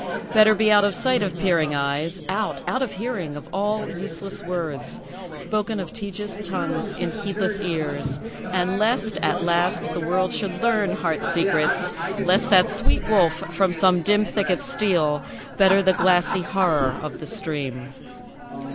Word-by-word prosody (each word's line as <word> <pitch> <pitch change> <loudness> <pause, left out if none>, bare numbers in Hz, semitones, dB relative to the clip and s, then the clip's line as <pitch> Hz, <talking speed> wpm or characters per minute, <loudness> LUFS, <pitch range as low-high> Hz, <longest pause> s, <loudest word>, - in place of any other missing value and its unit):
Better 215 -1 +6
be 215 0 +3
out 205 -1 +6
of 205 -2 +1
sight 255 -2 +2
of 185 -4 -2
peering 165 -5 +1
eyes; 145 +6 -2
Out 200 +3 -3
out 255 - -1
of 265 - -1
hearing 190 -8 -4
of 145 - -9
all 210 +2 -1
useless 190 +1 -6
words, 170 -5 -5 0.3
Spoken 210 +6 -2
of 180 -4 -6
tedious 205 -1 -6
tongues 180 -4 -3
in 175 -2 -3
heedless 205 -1 -2
ears. 155 -6 -3 0.3
And 185 +1 -1
lest, 220 -1 +1
at 180 0 0
last, 175 +1 +1
the - - -3
world 180 +3 0
should 200 -3 -3
learn 220 -4 +1
heart 165 -3 -2
secrets; 170 0 +1 0.3
Lest 185 0 +3
that 185 -3 +6
sweet 205 - 0
wolf 180 -7 +4 0.2
from 190 -2 +2
some 180 +1 +3
dim 205 +4 +3
thicket 190 -4 0
steal; 180 - 0 0.3
Better 195 0 +5
the 190 0 +4
glassy 180 0 +3
horror 160 -9 +1
of 150 -3 -6
the - - -8
stream. 140 - -4
185 Hz, 155 wpm, -23 LUFS, 170-205 Hz, 0.3 s, Better